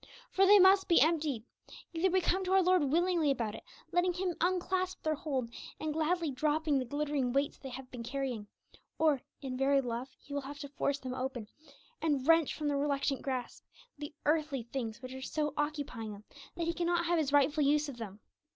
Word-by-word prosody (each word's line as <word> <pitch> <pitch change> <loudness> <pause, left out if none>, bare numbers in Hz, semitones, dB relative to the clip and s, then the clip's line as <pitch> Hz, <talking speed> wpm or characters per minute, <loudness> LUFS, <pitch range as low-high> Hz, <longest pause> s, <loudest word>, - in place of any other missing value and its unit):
For 390 0 +4
they 415 +1 +9
must 385 0 +6
be 340 - +5
emptied. 305 -7 +2 0.5
Either 340 +3 +2
we 375 +1 +2
come 375 +2 +1
to 370 - 0
our 385 -1 +5
Lord 365 -3 +4
willingly 335 +1 +2
about 230 -6 0
it, - - -8 0.3
letting 355 0 +2
Him 360 0 -1
unclasp 370 +1 0
their 310 - +1
hold, 275 -7 -3 0.3
and 310 -1 -2
gladly 320 0 0
dropping 300 +1 +1
the 255 - -2
glittering 285 -1 -1
weights 280 +1 0
they 270 - -7
have 255 0 -9
been 245 - -7
carrying, 245 -3 -3 0.5
or, 305 -5 +3 0.2
in 260 -2 -3
very 275 +1 +3
love, 245 0 -3
He 285 - -11
will 285 - -1
have 280 +2 -8
to 285 - -6
force 280 0 -1
them 260 -2 -6
open, 255 -4 -4 0.5
and 290 -5 +1
wrench 330 -2 +5
from 300 - -3
the 285 -1 +1
reluctant 280 -1 0
grasp 255 -3 -4 0.3
the 295 0 -7
'earthly 300 -4 +1
things' 235 -1 -5
which 255 0 -7
are 265 - -7
so 300 +2 -2
occupying 290 -8 -3
them 205 +1 -12 0.3
that 335 -1 -2
He 335 - 0
cannot 345 0 0
have 345 -1 +2
His 290 -3 0
rightful 290 +1 +4
use 295 +2 +3
of 275 -4 -7
them. 210 -3 -8
290 Hz, 205 wpm, -32 LUFS, 265-330 Hz, 0.5 s, they